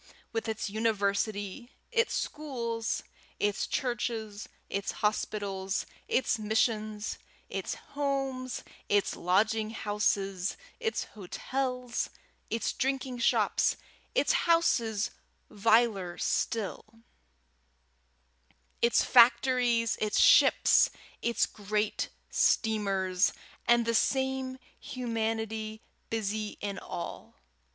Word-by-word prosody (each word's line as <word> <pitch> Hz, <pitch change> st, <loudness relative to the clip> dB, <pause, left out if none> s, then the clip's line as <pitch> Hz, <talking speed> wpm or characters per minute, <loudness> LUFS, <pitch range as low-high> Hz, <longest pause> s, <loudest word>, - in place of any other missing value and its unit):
with 225 Hz, 0 st, -2 dB
its 220 Hz, -1 st, -2 dB
university, 205 Hz, +1 st, -1 dB, 0.2 s
its 465 Hz, 0 st, +2 dB
schools, 235 Hz, -7 st, -2 dB, 0.4 s
its 205 Hz, 0 st, 0 dB
churches, 225 Hz, -4 st, -2 dB, 0.2 s
its 200 Hz, 0 st, -2 dB
hospitals, 200 Hz, -2 st, -1 dB, 0.2 s
its 250 Hz, -2 st, +1 dB
missions; 215 Hz, 0 st, 0 dB, 0.3 s
its -, -, -3 dB, 0.2 s
homes, 270 Hz, -3 st, -2 dB, 0.3 s
its 205 Hz, -1 st, +2 dB
lodging 215 Hz, +4 st, +2 dB
houses, 200 Hz, -4 st, -1 dB, 0.2 s
its 450 Hz, -2 st, -1 dB
hotels, 250 Hz, +5 st, -3 dB, 0.4 s
its 230 Hz, -, -1 dB
drinking 260 Hz, -1 st, -1 dB
shops, -, -, +2 dB, 0.4 s
its -, -, +3 dB, 0.2 s
houses 230 Hz, -11 st, +3 dB, 0.4 s
viler 205 Hz, -4 st, +2 dB
still; 220 Hz, -4 st, -1 dB, 2.0 s
its 235 Hz, 0 st, +4 dB
factories, 235 Hz, -1 st, +4 dB
its 215 Hz, -1 st, +1 dB
ships, -, -, +6 dB, 0.3 s
its 235 Hz, 0 st, +2 dB
great 210 Hz, 0 st, -2 dB, 0.2 s
steamers; 195 Hz, -4 st, +2 dB, 0.3 s
and 240 Hz, -1 st, +5 dB
the 230 Hz, -, +1 dB
same 265 Hz, +2 st, +1 dB, 0.2 s
humanity 225 Hz, -3 st, -3 dB, 0.3 s
busy 215 Hz, -1 st, -2 dB
in 200 Hz, -2 st, -4 dB
all! 85 Hz, -1 st, -7 dB
220 Hz, 85 wpm, -30 LUFS, 205-245 Hz, 2.0 s, ships